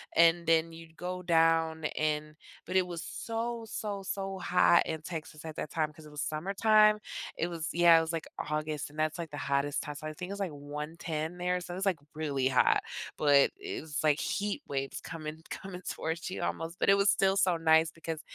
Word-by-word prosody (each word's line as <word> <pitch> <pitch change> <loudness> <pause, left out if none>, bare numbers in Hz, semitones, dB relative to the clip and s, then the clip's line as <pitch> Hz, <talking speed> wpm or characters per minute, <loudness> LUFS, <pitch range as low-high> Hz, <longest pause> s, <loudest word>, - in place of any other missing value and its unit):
and 170 0 +5
then 165 0 +3
you'd 165 0 -12
go 180 +1 -4
down 165 -1 +3
and 150 0 -1 0.3
but 185 - -5
it 185 - +4
was 170 -1 -5
so, 230 0 -4
so, 205 -2 -4
so 195 0 -3
hot 175 -1 +5
in 160 -1 -3
Texas 155 -2 -7
at 160 -1 -6
that - - -3
time 155 -2 0
'cause 155 0 -14
it 150 - -12
was 150 - -5
summertime. 210 +6 +4 0.4
It 170 - 0
was, 165 -2 -4
yeah, 170 -1 +7
it - - +4
was, 165 +1 -3
like, 165 - -3 0.2
August, 150 -1 -2
and 150 - -15
that's, 155 +2 0
like, 165 -2 -4
the - - -6
hottest 140 +1 0
time, 150 - -6
so 155 +2 -6
I 155 - -5
think 180 +3 -7
it - - -3
was, 200 - -7
like, 185 - -1
110 150 +3 -5
there, 180 0 0
so 175 0 -7
it - - -5
was, 195 - -2
like, 180 -6 +1 0.2
really 140 -4 0
hot, 130 - +4 0.4
but 145 -2 +5
it's, 385 - -4
like, 150 -1 +4
heat 205 +7 -1
waves 135 -1 -3
coming 160 0 -7
coming 185 -1 -7
towards 165 +3 -3
you 185 - -4
almost, 165 +2 -3
but - - +2
it 195 - +8
was 200 0 +4
still 195 -1 +3
so 185 -3 +3
nice 160 0 +4
because 165 -1 -5
165 Hz, 215 wpm, -31 LUFS, 155-180 Hz, 0.4 s, it